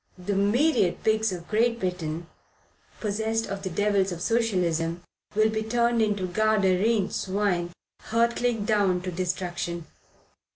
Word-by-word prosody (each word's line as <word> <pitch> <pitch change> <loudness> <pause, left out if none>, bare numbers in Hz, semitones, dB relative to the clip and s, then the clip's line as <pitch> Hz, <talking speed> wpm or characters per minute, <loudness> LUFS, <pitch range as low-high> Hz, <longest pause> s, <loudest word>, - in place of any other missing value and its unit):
The 185 +3 -3
myriad 205 - +2
pigs 220 -1 +2
of 175 -2 -6
Great 230 +2 +1
Britain, 170 -3 -3 0.7
possessed 220 +1 -1
of 195 0 -5
the 190 - -3
devils 195 +1 +1
of 175 - -5
Socialism, 175 -7 0 0.3
will 215 +1 +3
be 220 0 -1
turned 235 +1 +1
into 205 -3 +1
Gadarene 205 +1 +2
swine 190 -3 -1 0.4
hurtling 235 -1 +1
down 200 -4 +2
to 185 - -3
destruction. 175 -1 -3
200 Hz, 125 wpm, -26 LUFS, 180-220 Hz, 0.7 s, will